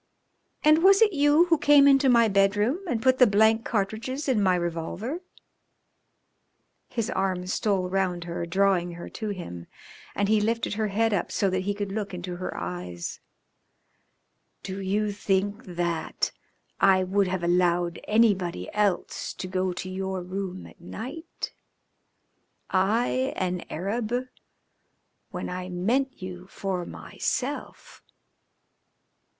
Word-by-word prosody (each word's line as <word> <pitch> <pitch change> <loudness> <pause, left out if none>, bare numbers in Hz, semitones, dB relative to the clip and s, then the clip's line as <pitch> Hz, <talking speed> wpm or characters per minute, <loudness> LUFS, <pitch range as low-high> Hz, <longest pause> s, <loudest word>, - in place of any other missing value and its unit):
"And 310 +2 +6
was 390 +1 +7
it 420 -3 +3
you 290 +3 +5
who 330 -3 +2
came 285 -1 +6
into 275 -1 +5
my 235 -2 +5
bedroom 205 - +2
and 225 -5 -1
put 260 0 +4
the 250 - +8
blank 220 +2 +4
cartridges 225 +7 -2
in 250 -6 +2
my 185 -2 +4
revolver?" 175 - -3 1.7
His 230 0 -2
arm 185 -3 -1
stole 190 0 0
round 180 -2 -1
her, 170 0 -4
drawing 185 -1 +2
her 170 0 -8
to 215 -2 -5
him, 130 - -6 0.5
and 200 - +1
he 215 0 +3
lifted 230 0 0
her 215 0 0
head 220 +2 +1
up 180 - -1
so 195 -2 +1
that 185 - 0
he 205 0 -1
could 205 -1 -4
look 200 -2 -3
into 175 0 -5
her 185 - -5
eyes. 90 0 -5 1.4
"Do 195 0 -5
you 205 +2 0
think 200 +1 -1
that 170 -2 -2 0.5
I 190 -1 +5
would 195 +1 +1
have 180 -1 -2
allowed 175 0 +2
anybody 195 - +2
else 205 -4 -1
to - - -5
go 185 0 -1
to 175 - -6
your 190 0 -3
room 185 0 -5
at - - -16
night? 260 - -7 1.2
I, 230 +7 +1
an 180 -1 -2
Arab, 210 +6 -3 1.2
when - - -5
I 180 0 -5
meant 230 +7 -1
you 180 0 -7
for 185 -3 -3
myself?" 270 +3 -4
195 Hz, 135 wpm, -26 LUFS, 180-225 Hz, 1.7 s, the